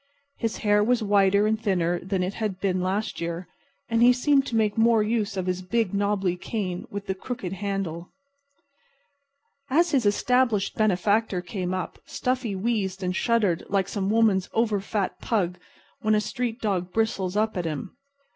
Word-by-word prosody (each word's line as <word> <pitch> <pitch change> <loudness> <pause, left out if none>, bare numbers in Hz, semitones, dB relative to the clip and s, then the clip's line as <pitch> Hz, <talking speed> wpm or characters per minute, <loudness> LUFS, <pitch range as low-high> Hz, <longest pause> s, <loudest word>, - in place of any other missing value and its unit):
His 225 -2 -1
hair 210 0 +4
was 240 +1 +2
whiter 200 0 +4
and 220 +1 0
thinner 175 -5 +1
than 190 0 -2
it 185 +2 -2
had 210 -4 -3
been 185 -2 0
last 195 +2 -2
year, 170 +1 -4 0.4
and 230 0 +1
he 245 +1 +8
seemed 275 +2 +2
to 235 - -3
make 215 -2 +2
more 225 -1 +4
use 210 -2 -1
of 185 - -1
his 185 0 -1
big, 215 +1 0
knobby 200 -3 0
cane 185 -2 -4
with 200 0 -6
the 190 - -1
crooked 190 -1 -5
handle. 195 -4 -3 1.6
As 335 +6 +3
his 260 -8 +2
established 230 -1 +2
benefactor 205 -1 +1
came 185 -1 -4
up 185 -1 -4
Stuffy 250 -5 -2
wheezed 195 -2 -1
and 185 0 -1
shuddered 210 -7 +1
like 195 -1 +1
some 195 -1 -2
woman's 215 -4 +3
over 220 -3 +1
fat 200 -1 -2
pug 180 -6 -1 0.4
when 215 0 +3
a - - +3
street 235 +2 -3
dog 185 -4 -1
bristles 200 -3 0
up 215 +1 +1
at 180 -2 -2
him. 160 +6 -4
205 Hz, 170 wpm, -25 LUFS, 185-225 Hz, 1.6 s, he